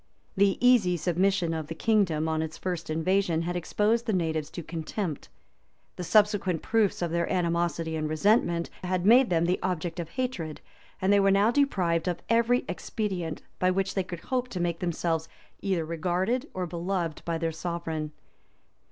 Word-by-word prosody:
The 195 0 +3
easy 205 -8 +4
submission 175 +1 +1
of 160 -2 -4
the 165 - -6
kingdom 170 -6 +2
on 160 0 0
its 160 0 -5
first 175 -3 -4
invasion 165 +1 +1
had 175 +1 -3
exposed 210 +7 +1
the 220 - +1
natives 160 -4 -1
to 175 - -7
contempt; 165 +1 -4 0.7
the 180 - -5
subsequent 205 -3 +2
proofs 220 -5 +1
of 170 - -1
their 170 0 0
animosity 170 -3 0
and 155 -1 -2
resentment 170 0 +2
had 180 0 -1
made 245 +4 +6
them 170 -1 +2
the 180 +2 +1
object 175 -1 -2
of 170 -2 -4
hatred; 185 - -3 0.4
and 195 +2 +4
they 200 - +5
were 195 0 +4
now 200 +3 +4
deprived 185 - +1
of 175 -1 -2
every 235 +2 +3
expedient 185 -8 -3 0.2
by 185 - +3
which 190 +1 0
they 190 - 0
could 175 -2 -7
hope 255 -1 -1
to 195 -7 -5
make 170 -1 -1
themselves 165 -2 -1 0.3
either 185 -5 0
regarded 185 - -1
or 185 -1 -1
beloved 170 -1 -3
by 170 -1 -1
their 165 0 -1
sovereign. 160 -2 -4
175 Hz, 170 wpm, -28 LUFS, 165-200 Hz, 0.7 s, made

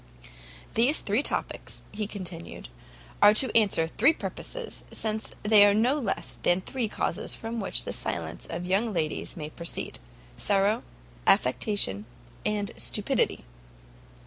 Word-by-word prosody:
"These 250 +7 +5
three 210 +5 +1
topics," - - -2
he 210 0 -3
continued, 175 - -7 0.5
"are 205 +1 +8
to 255 +1 +2
answer 200 -7 +3
three 250 - +4
purposes, - - -6
since 220 0 -3
there 210 -1 +7
are - - +3
no 235 +5 +3
less 220 -8 -3
than 175 +1 +3
three 245 +3 -2
causes - - -1
from 230 +1 -5
which 195 - +3
the - - -4
silence - - -4
of 180 - -4
young 205 +5 +1
ladies 160 -1 -2
may 155 -1 -6
proceed: 170 +1 -4 0.4
sorrow, 200 +3 +2 0.5
affectation, 125 - +2 0.4
and 210 -1 -1
stupidity." - - 0
205 Hz, 130 wpm, -27 LUFS, 180-225 Hz, 0.5 s, are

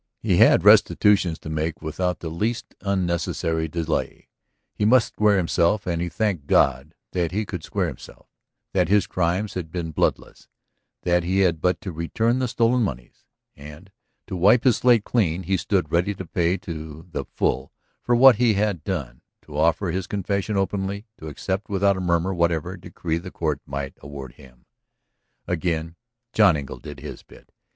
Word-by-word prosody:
He - - +1
had - - +6
restitutions 95 -6 +5
to - - -7
make 80 +1 -2
without 90 +3 -2
the 80 - -4
least 105 +9 -3
unnecessary 85 -4 -1
delay. 80 0 -3 0.4
He - - -3
must 115 +2 +4
square 105 -1 +2
himself 90 +3 +1
and 85 -2 -1
he 90 - -2
thanked 95 -7 -2
God 70 +5 +2 0.2
that 85 -3 -1
he 105 +3 -1
could 90 -5 -6
square - - -1
himself, - - -9 0.5
that 90 -3 +2
his 100 -2 +4
crimes 90 +4 -1
had 85 -4 -5
been 85 -2 -4
bloodless, - - -2 0.6
that 90 0 +2
he 95 +3 +1
had 85 -4 +2
but 90 0 +1
to 95 -3 -5
return 110 +9 0
the 130 - 0
stolen 120 +1 +2
moneys. 65 - -5 0.3
And, 75 +6 -12 0.3
to - - -6
wipe 100 +7 +4
his 125 -5 +4
slate 120 -4 +4
clean, 95 -7 0
he 95 +3 0
stood 90 -3 -1
ready 90 +4 +1
to 95 - -7
pay 85 +2 0
to 80 -2 -8
the - - -3
full - - -2 0.3
for 120 - +1
what 125 -1 +7
he 120 -3 +3
had 100 -5 0
done, 70 -11 -4 0.2
to 75 - -12
offer 85 +4 +1
his 95 +1 -3
confession 100 +1 -2
openly, 100 +1 -2
to 80 - -8
accept 95 +7 -4
without 100 0 +2
a 95 - -4
murmur 85 +1 +1
whatever 85 0 0
decree 85 -2 -4
the 90 +2 -8
court 80 -5 -2
might 70 0 -4
award 70 -3 -9
him. 65 -2 -18 0.8
Again 85 -1 -2 0.4
John 100 -8 +5
Engle 70 -2 -7
did 75 -2 -10
his - - -8
bit. - - -19
90 Hz, 175 wpm, -23 LUFS, 80-100 Hz, 0.8 s, what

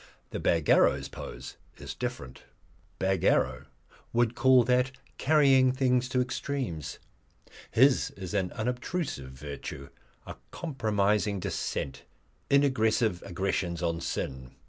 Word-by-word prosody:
But - - -4
Bagarrow's 80 -3 +3
pose - - -9 0.2
is - - -7
different. 65 - -6 0.6
Bagarrow 95 0 +1 0.5
would 120 -1 +2
call 130 0 +5
that 125 +2 +2 0.3
carrying 135 -3 +5
things 125 -1 +1
to 125 0 +1
extremes. 125 - -3 0.7
His 130 +3 +4
is 95 -1 -6
an 95 -3 0
unobtrusive 125 - -3
virtue, 70 0 -8 0.4
a - - -8
compromising 105 - 0
dissent, 70 - -4 0.4
inaggressive 115 -8 +2
aggressions 90 -2 -2
on 85 -1 -1
sin. 65 -5 -4
110 Hz, 100 wpm, -29 LUFS, 85-130 Hz, 0.7 s, call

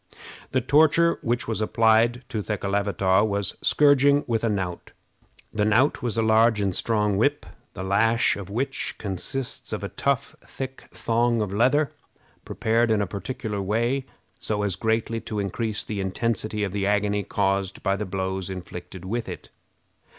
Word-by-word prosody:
The 130 - +1
torture 160 +5 +4
which 120 +2 -1
was 110 -1 -2
applied 115 +3 +3
to 110 - -2
Thekelavitaw 100 -2 +1
was 100 -2 -1
scourging 145 0 +4
with 115 -2 -1
a 115 - +2
knout. 95 -4 -3 0.6
The 105 - +1
knout 110 +7 +3
was 120 -2 -2
a 115 - +2
large 110 0 +4
and 100 -2 0
strong 105 -3 +1
whip, 145 +7 +1 0.3
the 95 - -5
lash 115 +5 +2
of 100 -2 -7
which 135 +6 -3
consists 110 +7 -4
of - - -3
a - - -3
tough, - - -1
thick 135 0 -7
thong 115 0 +1
of 105 -3 -2
leather, 130 +7 +3 0.5
prepared 115 +1 +1
in 110 -1 +3
a - - -1
particular 105 +2 -4
way, 120 +7 0 0.3
so 105 -1 -1
as 100 -3 0
greatly 115 +1 -1
to 105 - -5
increase 105 +2 -2
the 105 -2 -4
intensity 105 +2 -1
of 100 - -2
the 100 0 -1
agony 105 0 +1
caused 95 -1 -1
by 95 -1 +2
the 105 - -3
blows 95 0 -3
inflicted 90 0 -8
with 115 +4 -3
it. - - -9
110 Hz, 160 wpm, -25 LUFS, 100-120 Hz, 0.6 s, torture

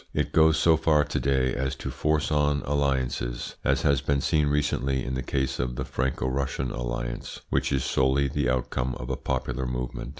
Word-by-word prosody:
It - - 0
goes 80 0 +5
so 80 -1 +4
far 75 -2 +3
to - - -2
day 65 -2 +1
as 65 +1 -2
to - - -5
force 75 0 0
on 75 -1 +2
alliances, 65 -4 -1
as - - +1
has 70 -1 +3
been 70 0 +1
seen 75 +2 +2
recently 70 -3 0
in 65 - -3
the 65 - -1
case 65 +1 -2
of 60 0 -1
the - - -3
Franco 65 +1 -1
Russian 65 -1 -2
alliance, - - -4
which 70 +1 +1
is 65 -2 +1
solely 65 +1 +2
the 70 0 0
outcome 65 0 -1
of 65 +2 -5
a - - 0
popular 65 -1 -2
movement. 60 0 -4
65 Hz, 195 wpm, -26 LUFS, 65-70 Hz, -, goes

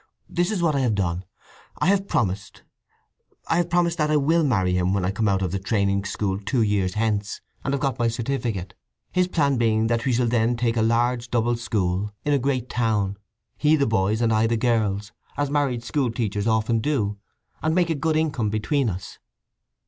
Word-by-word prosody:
"This 175 +1 0
is 200 -5 -1
what 160 -2 +3
I - - +2
have 120 -5 +1
done: 90 -2 -1 0.5
I - - 0
have 195 0 +2
promised—I 100 - -5
have 175 0 +1
promised—that 170 -3 +1
I 155 - +3
will 160 +4 +3
marry 95 -10 +2
him 90 +1 +1
when 95 -2 0
I 95 - +1
come 110 +2 0
out 95 -1 +1
of 90 - -1
the 95 - -2
training 100 0 0
school 100 -1 -2
two 105 +4 0
years 100 -3 0
hence, 105 -2 -1 0.2
and 135 - -1
have 140 -1 -1
got 135 -2 -1
my 120 - +2
certificate; 115 -6 -2 0.4
his 180 0 +2
plan 140 -6 +1
being 110 -1 +2
that 115 0 0
we 130 - +1
shall 120 +1 +2
then 115 0 +2
take 120 -1 0
a 115 - +1
large 120 +2 +1
double 120 0 +1
school 105 -4 -1
in 145 - +2
a 140 - +3
great 130 -2 -1
town—he 110 +4 -1
the 140 -2 +2
boys' 110 0 +1
and 115 -1 +2
I 110 +1 +3
the 115 0 +1
girls'—as 110 +4 -1
married 135 -5 0
school 135 0 0
teachers 105 -3 -2
often 110 +1 +2
do, 110 -6 -1 0.4
and 160 +1 +1
make 175 -2 +2
a - - +3
good 155 +2 0
income 145 -9 0
between 115 +5 0
us." 90 -1 -7
115 Hz, 195 wpm, -24 LUFS, 100-140 Hz, 0.5 s, what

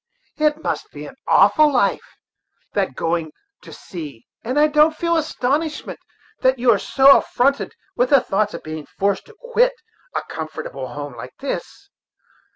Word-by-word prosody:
"It 305 +1 +1
must - - -3
be - - -9
an - - -10
awful 305 -1 +5
life, 280 - 0 0.6
that 195 -10 -1
going 165 -1 -1 0.3
to - - -13
sea! 145 -10 -9 0.2
and 255 +5 0
I 300 - +6
don't 305 +1 +4
feel 335 +1 0
astonishment 305 0 -2 0.4
that 260 0 +3
you 245 0 +4
are 205 - +3
so 275 +6 +6
affronted 275 +3 0 0.2
with 250 +1 +1
the 280 - +6
thoughts, 210 -1 -1
of - - -8
being 155 -1 -7
forced 200 0 0
to 455 - -17
quit - - +2 0.4
a - - -1
comfortable 155 -4 -6
home 145 +1 -7
like 125 +2 -9
this. 395 +7 -6
255 Hz, 160 wpm, -21 LUFS, -, 0.6 s, I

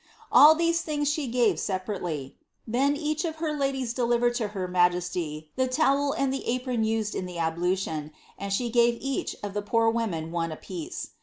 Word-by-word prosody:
All 310 +2 +9
these 335 +1 +1
things 295 -2 -2
she 295 -1 0
gave 240 -1 +2
separately. 180 -8 -3 0.3
Then 270 +5 +1
each 305 +1 -1
of 325 -2 -2
her 315 -1 -2
ladies 270 -4 -1
delivered 240 0 +2
to 225 - -1
her 195 -3 -4
majesty 175 -4 0
the 260 0 +2
towel 280 +1 +2
and 275 -3 0
the 270 - -3
apron 250 -1 0
used 220 -1 0
in 185 - -3
the 180 -1 -7
ablution, 165 -2 -1 0.2
and 200 0 -5
she 235 +4 0
gave 235 0 +4
each 275 -1 -2
of 205 -1 -4
the 205 - -1
poor 225 +2 +2
women 175 -9 -2
oos 165 -1 -1
a - - -4
piece. 345 0 -6
230 Hz, 185 wpm, -27 LUFS, 180-275 Hz, 0.3 s, All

